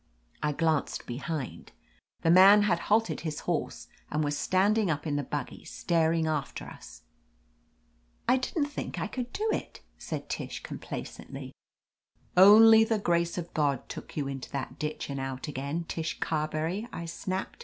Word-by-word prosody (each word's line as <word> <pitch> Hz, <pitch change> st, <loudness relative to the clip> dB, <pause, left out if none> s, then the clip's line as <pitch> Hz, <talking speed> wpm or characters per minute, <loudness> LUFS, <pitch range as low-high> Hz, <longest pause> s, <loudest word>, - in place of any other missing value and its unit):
I 150 Hz, -, +1 dB
glanced 155 Hz, 0 st, 0 dB
behind. 140 Hz, +3 st, -5 dB, 0.5 s
The 165 Hz, -, +4 dB
man 195 Hz, +4 st, +8 dB
had 180 Hz, -5 st, +2 dB
halted 225 Hz, +2 st, +2 dB
his 155 Hz, -2 st, -4 dB
horse -, -, -3 dB, 0.2 s
and 150 Hz, +1 st, 0 dB
was 145 Hz, 0 st, 0 dB
standing 200 Hz, +5 st, +2 dB
up 150 Hz, -1 st, -1 dB
in 150 Hz, -2 st, -1 dB
the 145 Hz, -, +1 dB
buggy, 140 Hz, 0 st, -5 dB
star 165 Hz, -2 st, +1 dB
ing 165 Hz, -1 st, +1 dB
after 155 Hz, -3 st, -2 dB
us. -, -, -12 dB, 1.2 s
"I 260 Hz, -, +5 dB
didn't 285 Hz, +4 st, -1 dB
think 290 Hz, -, -5 dB
I -, -, -1 dB
could 250 Hz, -1 st, -5 dB
do 430 Hz, +2 st, -2 dB
it," -, -, -5 dB, 0.2 s
said -, -, -5 dB
Tish -, -, -5 dB
com -, -, -7 dB
placently. -, -, -7 dB, 0.8 s
"Only 220 Hz, +4 st, +9 dB
the 225 Hz, 0 st, +1 dB
grace 170 Hz, -3 st, 0 dB
of 175 Hz, -1 st, -5 dB
God 140 Hz, -4 st, 0 dB
took -, -, -9 dB
you 145 Hz, -2 st, -1 dB
into 135 Hz, -2 st, -6 dB
that 135 Hz, -2 st, -5 dB
ditch 155 Hz, 0 st, -3 dB
and 140 Hz, -1 st, -4 dB
out 135 Hz, +1 st, -4 dB
again, 145 Hz, +4 st, -3 dB
Tish 160 Hz, -1 st, -4 dB
Carberry," 160 Hz, +7 st, -1 dB
I 170 Hz, -, -5 dB
snapped. 185 Hz, -, -4 dB
165 Hz, 165 wpm, -29 LUFS, 150-195 Hz, 1.2 s, Only